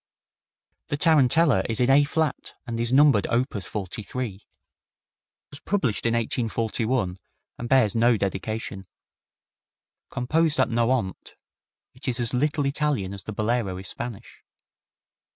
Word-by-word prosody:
The 145 - -2
Tarantella 155 -1 +4
is 110 - -1
in 125 +1 +3
A 140 +2 +6
flat, 150 0 -2
and 115 -2 -4
is 120 +1 +1
numbered 135 -6 +5
op. 125 +4 0
43. 105 +3 -5
It - - -24 1.1
was 140 - -11
published 135 - -1
in 115 - +1
1841 115 -3 -1 0.2
(?), - - -54
and 120 - -5
bears 130 -6 +4
no 115 0 +4
dedication. 100 0 -4 1.2
Composed 155 +4 +1
at 130 - +3
Nohant, 115 -4 -1 0.6
it - - -9
is 125 -1 0
as 120 0 +1
little 145 +3 0
Italian 140 -9 0
as 100 -3 -4
the - - -5
Bolero 110 -2 -1
is 95 0 -1
Spanish. 120 -5 -8
120 Hz, 135 wpm, -25 LUFS, 110-135 Hz, 1.2 s, A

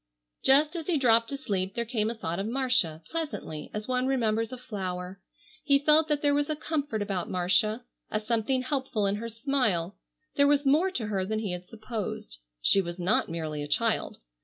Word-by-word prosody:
Just 295 +5 +5
as 330 -2 -4
he 345 -4 +2
dropped 230 -3 +4
to 275 - -3
sleep 195 -8 -2
there 235 - -1
came 220 -2 0
a 235 - -3
thought 170 -5 -3
of 200 - -2
Marcia, 240 -11 +1
pleasantly, 295 - -4
as 210 0 -5
one 255 0 0
remembers 225 -3 +1
a 255 - -5
flower. 190 -5 -5 0.4
He 280 -2 +5
felt 305 +2 +4
that 300 -1 0
there 290 -1 +4
was 290 +1 +1
a 310 - 0
comfort 290 -8 -2
about 195 -3 -3
Marcia, 190 +6 +2 0.2
a 215 - 0
something 230 +4 0
helpful 260 -6 -1
in 200 +1 +1
her 230 +2 -5
smile. 225 - 0 0.4
There 285 0 +5
was 290 0 +3
more 305 +8 +4
to 255 -12 -3
her 200 -3 -1
than 215 +3 -2
he 215 -3 -2
had 180 0 -6
supposed. 215 - -6 0.2
She 195 - +5
was 175 -1 -6
not 180 +4 +1
merely 155 -2 -4
a 145 - -4
child. - - 0
225 Hz, 200 wpm, -28 LUFS, 190-275 Hz, 0.4 s, Just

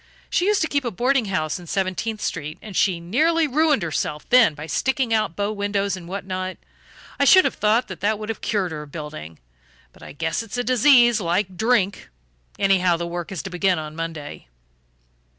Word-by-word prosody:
She 360 - +1
used 415 -4 +2
to - - 0
keep 285 -2 -1
a 240 - -1
boarding 245 +4 +1
house 170 -5 -2
in 175 - -12
Seventeenth 195 +4 -2
Street, 150 +3 -4
and 210 -3 -10
she 180 -2 +2
nearly 315 - +2
ruined 300 - +2
herself 150 -2 -3
then 230 -10 +6
by 155 +1 -7
sticking 260 - 0
out 215 -6 0
bow 205 +1 -1
windows 200 -1 -1
and 175 -2 -10
what 190 +1 -5
not; 185 0 -4 0.6
I - - +4
should 375 -1 +7
have - - +1
thought 215 +4 +1
that 205 +2 -1
would 215 +1 -7
have 225 - -4
cured 200 -6 -1
her 155 -1 -5
of 150 -1 -12
building, 85 - -8 0.6
but - - -20
I - - -10
guess 160 +5 -2
it's 225 +1 -7
a 245 - 0
disease, 245 -2 +5
like 185 +2 -1
drink. 220 - 0 0.5
Anyhow, 185 -3 +3
the 170 - -3
work 175 +1 -5
is 190 - -5
to 190 - -7
begin 180 0 +1
on 155 0 -6
Monday." 160 - -6
195 Hz, 200 wpm, -22 LUFS, 170-230 Hz, 0.6 s, should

